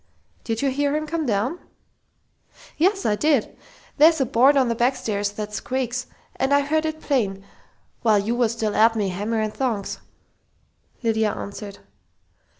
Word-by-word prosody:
"Did 225 +2 -2
you 275 - +2
hear 285 +2 0
him 310 0 -1
come 320 -1 -2
down?" 235 - 0 1.2
"Yes, 390 +5 +1
I 210 - +2
did! 285 -1 +1 0.4
There's 320 +2 +6
a 265 - +2
board 260 +5 +4
on 260 -2 +3
the 235 - +1
backstairs 225 -4 0
that 210 0 -6
squeaks, 250 +1 -3 0.3
and 265 +1 0
I 285 0 +5
heard 310 +2 0
it 315 0 -5
plain, 195 -9 -1 0.6
while 220 -3 +4
you 205 +3 0
was 240 -2 +2
still 220 -2 -2
at 225 +1 +5
me, 205 -3 0
hammer 205 +5 -2
and 215 -1 -2
tongs," 230 -7 -2 1.0
Lydia 220 -2 +1
answered. 200 0 -7
235 Hz, 155 wpm, -23 LUFS, 215-285 Hz, 1.2 s, There's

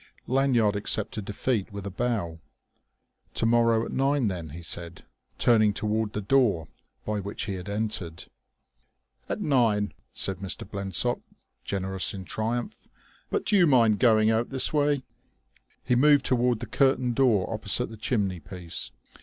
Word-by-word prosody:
Lanyard 125 -5 +2
accepted 105 0 -2
defeat 105 +1 -2
with 100 -1 -7
a 100 - -4
bow. 100 -7 -2 1.0
"To - - 0
morrow 115 -1 +3
at - - -7
nine, 135 -3 +1
then," 85 -4 -5
he 85 +4 -9
said, 85 +1 -4 0.3
turning 110 -3 +4
toward 105 +1 -1
the 105 - -2
door 105 - +2 0.4
by 105 -1 -1
which 100 +1 -4
he 100 - -3
had 95 +1 -6
entered. 100 -6 -3 1.0
"At - - -3
nine," 115 -7 +2 0.2
said 95 -1 -1
Mr. 95 0 -4
Blensop, 100 -3 -1 0.4
generous 95 0 -2
in 95 -1 -7
triumph. 120 - -3 0.4
"But 420 - -1
do 210 - +2
you 180 -4 +6
mind 115 -7 +4
going 110 -2 +4
out 115 +1 0
this 135 +2 +1
way?" 145 -2 +2 0.8
He 125 - +1
moved 145 +1 +5
toward 125 -2 +1
the - - -3
curtained 130 +1 +2
door 115 -7 +3
opposite 110 +3 0
the - - -8
chimney 100 -5 -1
piece. 85 +1 -5
110 Hz, 150 wpm, -27 LUFS, 100-125 Hz, 1.0 s, you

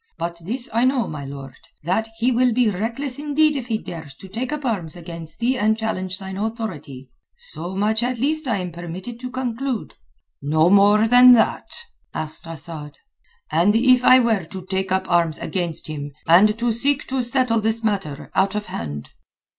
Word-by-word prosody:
But 170 0 -4
this 245 +6 -1
I 230 +2 +2
know, 255 -2 +2
my 145 -2 -6
lord, 135 -1 -9 0.3
that 190 +7 0
he 240 +3 +2
will 250 0 +3
be 240 -2 +3
reckless 235 +7 -3
indeed 300 +1 +2
if 255 -4 -4
he 225 -2 0
dares 160 -9 -9
to 190 - -12
take 235 +7 -4
up 300 -2 -4
arms 185 -10 -2
against 165 -2 -9
thee 245 +2 0
and 220 +1 +2
challenge 185 -5 -3
thine 190 0 -7
authority. 175 - -5 0.3
So 175 +5 -6
much 215 +3 +1
at 245 +1 -1
least 300 +4 0
I 225 -5 +1
am 180 -2 -4
permitted 175 +7 -7
to 250 0 -6
conclude." 250 -1 -3 0.5
"No 155 +4 +3
more 205 +2 +5
than 250 +2 +8
that?" 235 - +2 0.5
asked 155 +1 0
Asad. 155 -2 -7 0.5
"And 175 +7 +3
if 250 +1 +5
I 255 +1 +8
were 225 -6 +2
to 185 +2 -9
take 190 0 -2
up 190 0 0
arms 170 -3 +2
against 175 -4 -3
him, 145 -2 -6
and 205 +6 +6
to 235 0 +1
seek 275 +5 0
to 265 -1 0
settle 240 -2 +1
this 220 +1 -1
matter 195 -10 -2
out 195 +1 +1
of 210 0 -2
hand?" 75 -3 -5
210 Hz, 185 wpm, -22 LUFS, 170-245 Hz, 0.5 s, than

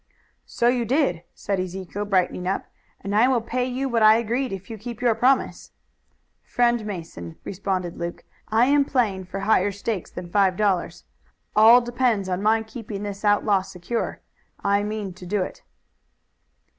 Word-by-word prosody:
"So 235 - 0
you 245 0 +2
did," 235 - +1
said 200 -2 -2
Ezekiel, 185 +2 -4
brightening 180 -2 0
up, 195 - -1 0.4
"and 200 +1 -3
I 225 +4 +5
will 260 -2 +3
pay 245 +2 -2
you 260 +2 -2
what 235 -3 0
I 215 +1 +7
agreed 235 +3 -1
if 195 0 -6
you 225 - -6
keep 235 +1 -7
your 245 -2 +3
promise." 255 +4 +1 0.7
"Friend 240 -2 +1
Mason," 165 - -7
responded 185 -2 -3
Luke, 170 0 -5 0.2
"I 225 +3 +3
am 285 +1 +4
playing 215 -9 0
for 190 +2 -6
higher 205 -1 +3
stakes 200 -1 -4
than 175 -1 -8
five 195 -2 +3
dollars. 200 -4 0 0.5
All 225 +3 +8
depends 240 -5 0
on 180 +1 -1
my 220 +2 +3
keeping 220 -2 -7
this 205 0 -6
outlaw 205 -1 +3
secure. 190 +5 -4 0.4
I 200 0 +2
mean 210 -2 -4
to 180 0 -12
do 200 0 0
it." - - -8
210 Hz, 165 wpm, -24 LUFS, 190-235 Hz, 0.7 s, All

